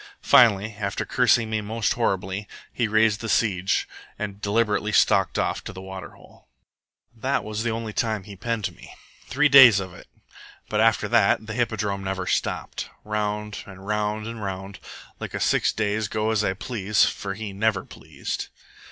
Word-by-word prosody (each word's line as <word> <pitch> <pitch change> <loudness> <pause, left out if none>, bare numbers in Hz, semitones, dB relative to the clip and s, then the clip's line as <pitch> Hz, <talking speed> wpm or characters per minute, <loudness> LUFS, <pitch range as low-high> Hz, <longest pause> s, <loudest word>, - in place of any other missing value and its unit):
Finally, 110 -2 +5
after 100 -1 -2
cursing 120 -2 +3
me 110 -1 -1
most 110 +1 -1
horribly, 95 -3 -2 0.3
he 120 - 0
raised 110 0 +2
the 115 - -4
siege 95 -4 +1 0.3
and 100 -1 -5
deliberately 105 0 +1
stalked - - +3
off - - -1
to - - -7
the 95 - -10
water 95 0 -8
hole. - - -20 0.7
"That 130 +3 -1
was 110 0 -4
the 115 - -1
only 110 -1 -4
time 110 -4 -1
he 100 0 -10
penned 115 +1 -3
me, - - -14 0.3
three 150 +3 +3
days 130 -7 +9
of 95 -2 -6
it, - - -14 0.6
but 105 - 0
after 110 -2 +3
that 110 -2 +3
the 110 - -6
hippodrome 105 -4 -1
never 95 -1 -3
stopped. - - -2
Round, 105 0 -3
and 95 -1 -12
round, 105 0 -1
and 115 -1 -6
round, 95 0 -6 0.4
like - - -6
a - - -2
six - - +2
days' 105 0 -1
go 110 +1 -1
as 110 -1 +1
I 95 - +1
please, 105 -1 +1
for 95 -1 -4
he 105 -1 -6
never 100 -1 0
pleased. - - -6
105 Hz, 170 wpm, -24 LUFS, 100-110 Hz, 0.7 s, days